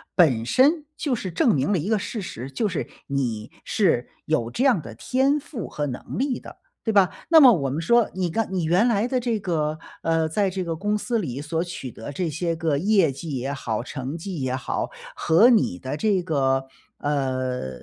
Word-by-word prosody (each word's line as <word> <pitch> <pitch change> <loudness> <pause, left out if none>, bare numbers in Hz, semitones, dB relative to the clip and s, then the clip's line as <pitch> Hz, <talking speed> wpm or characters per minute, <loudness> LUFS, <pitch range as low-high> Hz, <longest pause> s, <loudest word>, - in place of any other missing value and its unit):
本 130 - +4
身 295 - +3
就 280 -6 -1
是 190 -4 -4
证 180 +6 +3
明 140 +9 +1
了 - - +3
一 170 +7 -3
个 220 -2 +2
事 215 +2 -4
实， 135 -7 -6
就 205 - -1
是 165 - -3 0.2
你 120 -6 -2
是 170 - +1 0.2
有 120 -7 0
这 250 - -1
样 240 - +4
的 115 -4 -10
天 265 - +1
赋 250 - -6
和 150 - -3
能 125 -3 -6
力 265 0 0
的， - - -12 0.2
对 220 - -1
吧？ 190 -4 +5 0.2
那 320 -2 +7
么 255 -3 +10
我 140 - +1
们 150 +5 -2
说， 235 +5 +3
你 180 -2 -1
刚 225 +5 -1
你 180 -3 0
原 180 +9 +3
来 220 -1 +2
的 255 0 0
这 235 -2 0
个， 155 -4 -1 0.2
呃， 165 -1 +1
在 195 +3 +1
这 185 0 -3
个 165 -2 -3
公 210 +3 0
司 235 +2 -1
里， 140 - -3
所 160 +2 -2
取 170 -8 -6
得 115 +7 -8
这 175 +1 -1
些 165 +2 -1
个 160 -4 0
业 190 -3 +3
绩 140 +1 -6
也 130 +2 -2
好， 115 -5 -3
成 135 +4 -5
绩 175 -2 -5
也 130 0 -1
好， 130 - -3 0.2
和 190 - +5
你 210 - +3
的 130 +7 -5
这 195 -1 +1
个 135 -5 +1 0.4
呃， 130 - -1
165 Hz, 225 characters per minute, -24 LUFS, 135-210 Hz, 0.4 s, 么